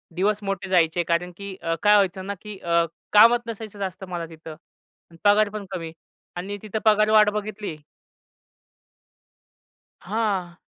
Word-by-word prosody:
दिवस 200 Hz, +3 st, +1 dB
मोठे 195 Hz, -1 st, -3 dB
जायचे 175 Hz, -1 st, +3 dB
कारण, 170 Hz, +1 st, -1 dB
की 200 Hz, -1 st, -7 dB
अ, 165 Hz, 0 st, -1 dB
काय 210 Hz, 0 st, +6 dB
व्हायचं 190 Hz, -2 st, +1 dB
ना 200 Hz, -, -3 dB
की 210 Hz, -2 st, -8 dB
अ, 170 Hz, 0 st, +2 dB, 0.3 s
कामच 230 Hz, +3 st, +7 dB
नसायचं 220 Hz, -2 st, -7 dB
जास्त 190 Hz, -1 st, -5 dB
मला 175 Hz, -2 st, -4 dB
तिथं. 160 Hz, -1 st, -10 dB, 0.6 s
अन् 165 Hz, -, -16 dB
पगार 205 Hz, +1 st, +5 dB
पण 210 Hz, -1 st, -6 dB
कमी 165 Hz, -4 st, -5 dB, 0.5 s
आणि 195 Hz, +3 st, -4 dB
तिथं 215 Hz, 0 st, -3 dB
पगारवाढ 215 Hz, 0 st, +5 dB
बघितली 210 Hz, -3 st, -5 dB, 2.3 s
हां. 195 Hz, -4 st, -2 dB
200 Hz, 140 wpm, -24 LUFS, 175-210 Hz, 2.3 s, कामच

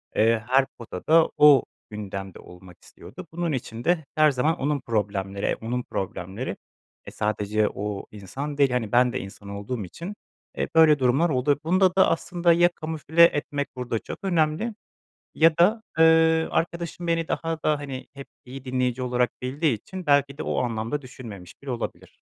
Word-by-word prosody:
eee, 110 Hz, 0 st, +3 dB
her 135 Hz, +2 st, +4 dB
potada, 155 Hz, -, +2 dB
o 145 Hz, -2 st, +7 dB, 0.3 s
gündemde 100 Hz, -2 st, -7 dB
olmak 90 Hz, 0 st, -14 dB
istiyordu. 185 Hz, -, -12 dB
Bunun 170 Hz, 0 st, -2 dB
için 120 Hz, -4 st, -5 dB
de 170 Hz, -1 st, +1 dB
her 155 Hz, -1 st, +5 dB
zaman 150 Hz, +6 st, +1 dB
onun 145 Hz, +1 st, 0 dB
problemleri, 100 Hz, -4 st, -2 dB
e, -, -, +1 dB
onun 120 Hz, +2 st, -3 dB
problemleri. 95 Hz, +4 st, -5 dB, 0.5 s
E, -, -, -9 dB
sadece 105 Hz, 0 st, 0 dB
o 105 Hz, -1 st, -5 dB
insan 135 Hz, +9 st, -6 dB
değil, 140 Hz, -2 st, +4 dB
hani, 120 Hz, -4 st, -1 dB
ben 125 Hz, 0 st, +4 dB
de -, -, -2 dB
insan 100 Hz, +1 st, -10 dB
olduğum 100 Hz, +3 st, -4 dB
için, 170 Hz, -, -8 dB, 0.4 s
eee, -, -, -1 dB
böyle 155 Hz, -2 st, +6 dB
durumlar 135 Hz, +7 st, +3 dB
oldu. 140 Hz, +1 st, +1 dB
Bunda 185 Hz, +2 st, +3 dB
da 190 Hz, -, +5 dB
aslında 170 Hz, +1 st, +2 dB
ya 175 Hz, +1 st, +5 dB
kamufle 160 Hz, +1 st, +2 dB
etmek 145 Hz, -3 st, +2 dB
burada 125 Hz, -3 st, -2 dB
çok -, -, -8 dB
önemli 175 Hz, +4 st, 0 dB, 0.6 s
ya 160 Hz, 0 st, +4 dB
da, 210 Hz, +6 st, +4 dB, 0.2 s
ııı, 160 Hz, 0 st, +5 dB
arkadaşım 170 Hz, +1 st, -2 dB
beni 165 Hz, -1 st, 0 dB
daha 165 Hz, -1 st, -3 dB
da, 150 Hz, -1 st, +2 dB
hani, 135 Hz, -3 st, -7 dB
hep 140 Hz, -1 st, -9 dB, 0.2 s
iyi 130 Hz, +1 st, -10 dB
dinleyici 125 Hz, -1 st, -1 dB
olarak 125 Hz, -1 st, +1 dB
bildiği 140 Hz, +2 st, 0 dB
için 185 Hz, -, -9 dB
belki 140 Hz, -1 st, +2 dB
de -, -, -3 dB
o -, -, -2 dB
anlamda 115 Hz, +4 st, -2 dB
düşünmemiş 105 Hz, -9 st, -10 dB
bile 140 Hz, -, -6 dB
olabilir. 120 Hz, -2 st, -6 dB
135 Hz, 165 wpm, -25 LUFS, 115-160 Hz, 0.6 s, o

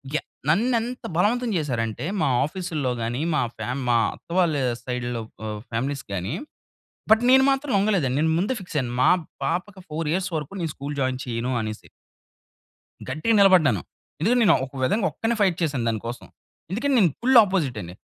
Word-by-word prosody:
Yeah! -, -, -1 dB, 0.2 s
నన్ను 235 Hz, +10 st, +3 dB
ఎంత 245 Hz, +2 st, -6 dB
బలవంతం 235 Hz, +6 st, +2 dB
చేసారంటే 120 Hz, -5 st, -2 dB, 0.2 s
మా 155 Hz, -, +2 dB, 0.2 s
ఆఫీసుల్లో 155 Hz, -5 st, -3 dB
గాని, 120 Hz, +4 st, -2 dB
మా 150 Hz, -, +2 dB, 0.2 s
ఫ్యా -, -, -4 dB, 0.2 s
మా 120 Hz, -, +4 dB, 0.2 s
అత్త -, -, -25 dB
వాళ్ళ 170 Hz, -4 st, +3 dB, 0.3 s
సైడ్‌లో 120 Hz, -2 st, -3 dB, 0.2 s
ఆహ్, 105 Hz, -1 st, -4 dB
ఫ్యామిలీస్ 135 Hz, +4 st, -2 dB
గాని, 95 Hz, +3 st, -3 dB, 0.8 s
బట్ 220 Hz, -, +5 dB
నేను 265 Hz, +1 st, +7 dB
మాత్రం 275 Hz, +1 st, -1 dB
లొంగలేదండి. 190 Hz, -10 st, +1 dB
నేను 160 Hz, +1 st, +2 dB
ముందే 205 Hz, +9 st, 0 dB
ఫిక్స్ 180 Hz, -4 st, -7 dB
అయ్యాను. 125 Hz, -3 st, -2 dB
మా -, -, +6 dB, 0.3 s
పాపకి 185 Hz, +3 st, -3 dB
4 155 Hz, +1 st, -3 dB
ఇయర్స్ 185 Hz, +1 st, -1 dB
వరకు 150 Hz, +1 st, -5 dB
నేను 160 Hz, -, -2 dB
స్కూల్ 145 Hz, +1 st, -5 dB
జాయిన్ 130 Hz, -1 st, 0 dB
చెయ్యను 120 Hz, +1 st, -2 dB
అనేసి. 110 Hz, -1 st, -6 dB, 1.2 s
గట్టిగా 155 Hz, -, 0 dB
నిలబడ్డాను. 170 Hz, -, +5 dB, 0.4 s
ఎందుకంటే 230 Hz, +10 st, +2 dB
నేను -, -, +6 dB
ఒక 130 Hz, -, -16 dB
విధంగా 210 Hz, -, +1 dB
ఒక్కడినే 225 Hz, +1 st, -1 dB
ఫైట్ 185 Hz, -4 st, +3 dB
చేశాను 140 Hz, -7 st, 0 dB
దానికోసం. 115 Hz, +2 st, -4 dB, 0.5 s
ఎందుకంటే 265 Hz, +8 st, 0 dB
నేను 180 Hz, -7 st, +4 dB
ఫుల్ 255 Hz, +1 st, +5 dB
అపోజిట్ 165 Hz, -, -1 dB
అండి. 85 Hz, 0 st, -8 dB
155 Hz, 165 wpm, -24 LUFS, 125-200 Hz, 1.2 s, నేను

